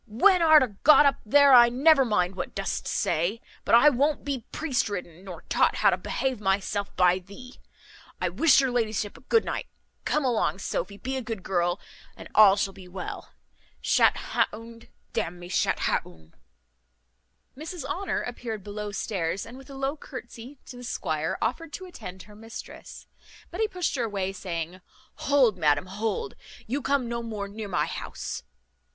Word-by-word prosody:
when 360 - +4
art 315 -3 +7
a - - 0
got 300 0 +7
up 275 -1 +3
there 280 +5 +6
I 240 -1 +9
never 275 +3 +5
mind 195 -6 +1
what 180 - -5
dost 195 0 -3
say; 175 +8 0 0.2
but - - +4
I 285 +6 +8
won't 285 +3 +1
be 270 -5 -4
priest 275 -8 -1
ridden, 180 -3 -6
nor 185 -3 -9
taught - - +2
how - - +4
to - - 0
behave 260 -5 -2
myself 200 +1 0
by 180 0 +4
thee. 205 +8 -13 0.6
I - - 0
wish 330 -3 +4
your 265 -2 +1
ladyship 220 -4 -1
a - - -14
good 450 - +2
night. - - -3 0.4
Come 300 -2 0
along, 235 -5 +1
Sophy; 195 +1 -4
be 265 +4 -4
a - - -2
good 225 -5 -6
girl, 175 0 0 0.4
and - - -10
all 205 -2 +8
shall 200 -1 -1
be 185 -1 -13
well. 180 0 -7 0.5
Shat - - +3
ha' - - 0
un, 230 +1 -11 0.3
d 225 - +1
n 175 -1 -6
me, 175 0 -10
shat - - 0
ha' - - +1
un!" 80 -2 -17 1.2
Mrs 315 +1 -7
Honour 350 +8 -2
appeared 230 -4 -6
below 205 +1 -5
stairs, 195 -3 -2
and 230 - -11
with 270 +1 -13
a 275 - -9
low 270 +2 -2
curtesy 255 -2 -10
to 250 - -10
the 245 - -10
squire 160 -9 -2
offered 290 +7 -2
to 375 - -6
attend 190 - -9
her 210 - -15
mistress; 225 +2 -10 0.5
but 355 +5 -4
he 440 - +3
pushed 360 -6 -2
her 240 - 0
away, 195 -3 -2
saying, 180 -1 -5 0.5
"Hold, 260 -9 +4
madam, 150 0 +2
hold, 205 +1 -3 0.3
you 270 +6 -2
come 270 -2 0
no 235 0 -3
more 215 -3 -5
near 210 +1 -7
my 195 - 0
house." - - -6
225 Hz, 180 wpm, -26 LUFS, 195-270 Hz, 1.2 s, I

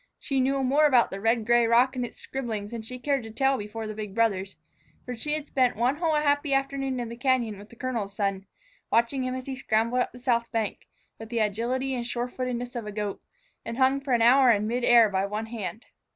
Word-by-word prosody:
She 275 -1 -2
knew 270 +1 +1
more 285 +4 +4
about 250 -5 +4
the 195 - -5
red 225 0 +1
gray 240 0 +4
rock 245 +3 +4
and 250 - -1
its 240 - -7
scribblings 225 -6 -5
than 235 -1 -5
she 250 +3 -7
cared 275 +1 0
to 225 - -9
tell 270 +5 +1
before 220 -1 -5
the 215 - -5
big 210 -2 -7
brothers, 200 -4 0 0.5
for 250 - -5
she 295 +6 -2
had 305 -1 -2
spent 255 -4 +1
one 245 +6 +1
whole 320 -2 +1
happy 285 -1 +2
afternoon 270 -1 -1
in 240 - -3
the 235 - -7
cañon 240 -5 0
with 205 +1 -13
the - - -15
colonel's 230 -6 -3
son, 195 -2 -2 0.4
watching 235 +3 +2
him 255 0 -2
as 255 0 -6
he 270 - -4
scrambled 235 -1 +1
up - - -2
the - - -13
south 240 -2 0
bank, 220 -3 -3 0.3
with 225 0 -9
the 235 - -3
agility 235 +5 0
and 240 -2 -3
sure 240 0 -2
footedness 245 -1 -4
of 230 -3 -4
a - - -4
goat, 205 -1 -4 0.4
and 230 - -5
hung 265 +1 +3
for 275 -2 -1
an 235 -1 +3
hour 255 +2 +6
in 210 -2 +3
mid 240 +3 -1
air 235 -2 +7
by 190 -2 0
one 210 +2 -3
hand. 220 -2 -6
240 Hz, 240 wpm, -27 LUFS, 220-260 Hz, 0.5 s, air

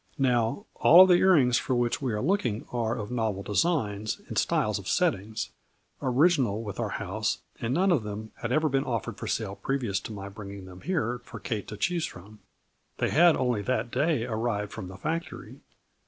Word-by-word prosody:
Now, 125 - +1
all 175 - +8
of 185 - +3
the - - +7
ear 190 +1 +5
rings 125 -7 +4
for 130 - -1
which 120 +2 0
we 130 -3 -1
are 105 -1 -2
looking 130 - 0
are 120 -1 -1
of 105 +2 -5
novel 110 -5 -1
designs 105 - 0
and - - -6
styles - - +1
of - - -10
settings, 105 +2 0 0.5
original 130 - +2
with 105 -3 -6
our - - -1
house, - - -2 0.2
and 115 - -2
none 185 +7 +3
of 160 -8 +3
them 105 +1 -6
had 115 - -4
ever 155 +4 +3
been 135 -1 +1
offered 115 -5 -3
for - - -5
sale 100 -3 -2
previous 125 -8 -1
to - - -8
my 100 -2 -6
bringing 100 -1 -9
them 90 0 -12
here 125 -10 -1
for - - -9
Kate 110 -5 -4
to 105 - -7
choose 170 - 0
from. 105 +4 -13 0.6
They - - 0
had 170 +2 +6
only 125 -5 0
that 125 +2 -1
day 140 -2 +1
arrived 110 -3 -2
from 95 - -7
the 95 0 -9
factory. 160 - -5
120 Hz, 200 wpm, -28 LUFS, 105-140 Hz, 0.6 s, all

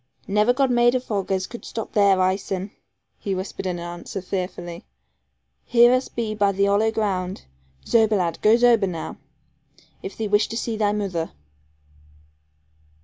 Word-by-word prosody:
'Never 210 +4 +3
God 265 0 +1
made 240 +1 +4
vog 215 -6 -2
as 190 -1 0
could 235 - -10
stop 225 - -6
their 200 -2 +4
eyesen,' 190 +1 -1 0.5
he 195 -2 -2
whispered 190 0 -5
in 180 -1 -2
answer, 175 +3 -6
fearfully; 180 -2 -5 0.8
'here 240 +1 +5
us 255 +1 +1
be 225 -2 -3
by 205 -2 +2
the 200 +1 +1
hollow 205 +2 +3
ground. 195 -4 -2 0.4
Zober, 220 -2 +3
lad, 170 -3 -1
goo 215 +2 +5
zober 235 -4 +4
now, 165 -3 -6 0.8
if 190 - -8
thee 220 - -2
wish 205 +1 +3
to 230 - -5
see 230 -1 -2
thy 210 -1 +1
moother.' 195 -6 -2
205 Hz, 150 wpm, -23 LUFS, 185-225 Hz, 0.8 s, here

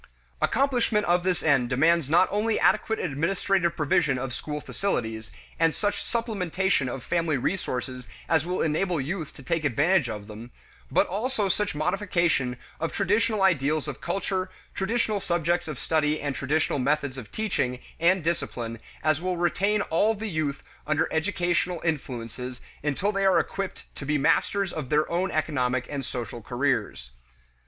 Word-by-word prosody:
Accomplishment 245 -5 +2
of 175 +1 +3
this 180 -1 0
end 135 -6 +3
demands 155 +3 +3
not 175 +4 +5
only 215 +2 +1
adequate 220 - +3
administrative 170 +3 0
provision 145 -2 +2
of 125 -1 -3
school 150 +3 -4
facilities, 110 - -2 0.3
and 165 -1 +3
such 205 -1 -1
supplementation 190 - 0
of 125 0 -5
family 165 -4 +1
resources 125 - -3 0.2
as 160 -2 +3
will 180 +2 -1
enable 165 +2 +1
youth 160 +3 -3
to 135 - -12
take 165 +5 -1
advantage 145 +2 +3
of 105 -2 -5
them, 110 +3 -9 0.4
but - - +3
also 215 +2 -1
such 200 -1 0
modification 165 -6 +1 0.2
of 165 +1 -1
traditional 210 +1 +1
ideals 155 -4 +2
of 145 - -6
culture, 190 -1 -1 0.2
traditional 215 +1 0
subjects 175 -1 0
of 155 -4 -5
study 155 +1 +1
and 145 -1 -2
traditional 145 +2 0
methods 140 0 0
of 110 - -11
teaching 185 -13 -1 0.2
and 175 +1 +3
discipline 120 -8 -2 0.2
as 155 0 +2
will 185 0 -1
retain 200 +5 +2
all 210 +7 +2
the 215 0 -4
youth 150 -3 -2 0.2
under 155 +1 +2
educational 175 0 0
influences 125 -5 -3 0.2
until 150 +8 0
they 195 -1 0
are 190 -2 +5
equipped 195 +3 -2
to 140 - -7
be 150 0 +2
masters 195 +6 +2
of 150 -5 -4
their 150 +1 +3
own 180 +3 +1
economic 130 -6 0
and 140 -2 -3
social 120 -2 -5
careers. 120 - -1
160 Hz, 155 wpm, -26 LUFS, 135-190 Hz, 0.4 s, not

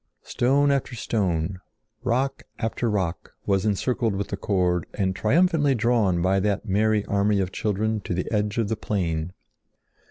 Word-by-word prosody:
Stone 140 +3 +2
after 135 -2 -1
stone, 95 -5 -1 0.4
rock 130 +2 0 0.2
after 115 0 -1
rock, 95 -5 -2
was 100 +1 +1
encircled 110 +1 0
with 100 +1 -3
the - - -2
cord 90 -4 0
and 95 -2 0
triumphantly 145 - +3
drawn 110 -7 +2
by 95 +2 +3
that 100 +1 0
merry 105 +1 +2
army 100 0 +1
of 95 -1 -1
children 110 +2 -1
to 90 - -3
the 90 - -1
edge 105 -1 0
of 115 -3 +1
the 110 - -1
plain. 85 -6 -2
105 Hz, 155 wpm, -25 LUFS, 95-115 Hz, 0.4 s, triumphantly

